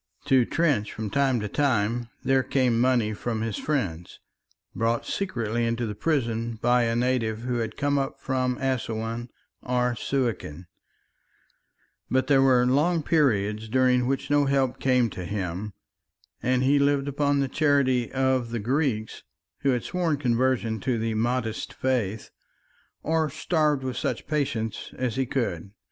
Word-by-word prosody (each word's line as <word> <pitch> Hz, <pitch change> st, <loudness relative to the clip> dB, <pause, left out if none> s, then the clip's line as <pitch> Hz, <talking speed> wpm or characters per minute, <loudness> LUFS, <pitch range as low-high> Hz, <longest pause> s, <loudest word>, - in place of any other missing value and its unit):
To 135 Hz, -4 st, +4 dB
Trench 145 Hz, -11 st, +1 dB
from 110 Hz, -2 st, -5 dB
time 135 Hz, -3 st, +2 dB
to 105 Hz, -, -2 dB
time 120 Hz, -2 st, 0 dB
there 135 Hz, 0 st, +3 dB
came 125 Hz, -3 st, +1 dB
money 120 Hz, -4 st, +2 dB
from 110 Hz, +1 st, -3 dB
his 110 Hz, -2 st, -2 dB
friends, 95 Hz, -, -3 dB, 0.5 s
brought 115 Hz, +1 st, 0 dB
secretly 120 Hz, -, -2 dB
into 115 Hz, +1 st, 0 dB
the 105 Hz, -, -3 dB
prison 115 Hz, -3 st, -1 dB
by 120 Hz, 0 st, +3 dB
a 115 Hz, 0 st, 0 dB
native 120 Hz, -3 st, 0 dB
who 125 Hz, 0 st, -2 dB
had 110 Hz, -1 st, -4 dB
come 145 Hz, 0 st, +1 dB
up 135 Hz, -, -3 dB
from 130 Hz, -1 st, -1 dB
Assouan 115 Hz, -2 st, -2 dB, 0.3 s
or 125 Hz, -1 st, 0 dB
Suakin; 115 Hz, -, -2 dB, 1.4 s
but 130 Hz, 0 st, +2 dB
there 135 Hz, 0 st, +4 dB
were 130 Hz, -2 st, +4 dB
long 155 Hz, +6 st, +2 dB
periods 110 Hz, -9 st, +1 dB
during 125 Hz, 0 st, +3 dB
which 135 Hz, +2 st, -2 dB
no 145 Hz, 0 st, +4 dB
help 135 Hz, -2 st, +1 dB
came 125 Hz, -2 st, +3 dB
to 90 Hz, -, -6 dB
him, 95 Hz, +2 st, -4 dB, 0.7 s
and 130 Hz, +1 st, +1 dB
he 140 Hz, +2 st, +4 dB
lived 140 Hz, 0 st, +2 dB
upon 140 Hz, 0 st, +1 dB
the 135 Hz, -, +1 dB
charity 130 Hz, -4 st, +2 dB
of 130 Hz, -2 st, +1 dB
the 120 Hz, -, -3 dB
Greeks 115 Hz, -1 st, -1 dB, 0.4 s
who 140 Hz, -, +1 dB
had 125 Hz, -3 st, +1 dB
sworn 175 Hz, -5 st, 0 dB
conversion 120 Hz, -3 st, +1 dB
to 120 Hz, +4 st, -1 dB
the 115 Hz, 0 st, -1 dB
Mahdist 115 Hz, 0 st, -1 dB
faith, 115 Hz, -5 st, -2 dB, 0.7 s
or 160 Hz, -1 st, +1 dB
starved 155 Hz, -2 st, 0 dB
with 130 Hz, -1 st, -3 dB
such -, -, -2 dB
patience 140 Hz, -8 st, -2 dB
as 125 Hz, -3 st, -1 dB
he 130 Hz, -1 st, 0 dB
could. 100 Hz, -9 st, -2 dB
125 Hz, 150 wpm, -26 LUFS, 115-135 Hz, 1.4 s, To